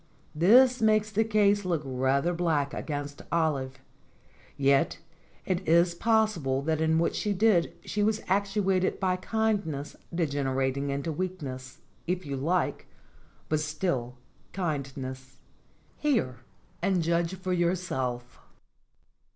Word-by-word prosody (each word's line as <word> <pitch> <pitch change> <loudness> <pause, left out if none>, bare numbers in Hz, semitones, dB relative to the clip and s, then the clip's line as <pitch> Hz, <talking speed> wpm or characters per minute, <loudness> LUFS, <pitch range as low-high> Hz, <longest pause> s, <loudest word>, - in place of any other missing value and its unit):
This 245 +10 +5
makes 215 -1 +3
the 220 +1 +2
case 205 -2 +3
look 170 -5 -1
rather 135 +5 +1
black 160 -5 0
against 145 -1 -5
Olive; 140 -6 0 0.8
yet 140 -1 +3 0.5
it 185 0 -2
is 170 +1 +4
possible 175 -10 +1
that 160 +1 0
in 160 0 +3
what 165 - +1
she 210 - 0
did 195 -4 +3
she 210 - -2
was 215 +1 +2
actuated 195 -1 +1
by 185 -2 +1
kindness 200 -8 -1 0.2
degenerating 140 -4 -1
into 140 +4 -2
weakness, 145 -7 -5 0.3
if 180 +1 -2
you 140 -1 -3
like, 165 +7 -1 0.6
but 155 - +1
still 150 -5 -2 0.4
kindness. 135 -6 -4 0.6
Hear 230 - 0 0.4
and 185 -1 +1
judge 170 +2 0
for 185 0 -3
your 175 0 +2
self. 125 -8 -4
170 Hz, 120 wpm, -28 LUFS, 140-190 Hz, 0.8 s, This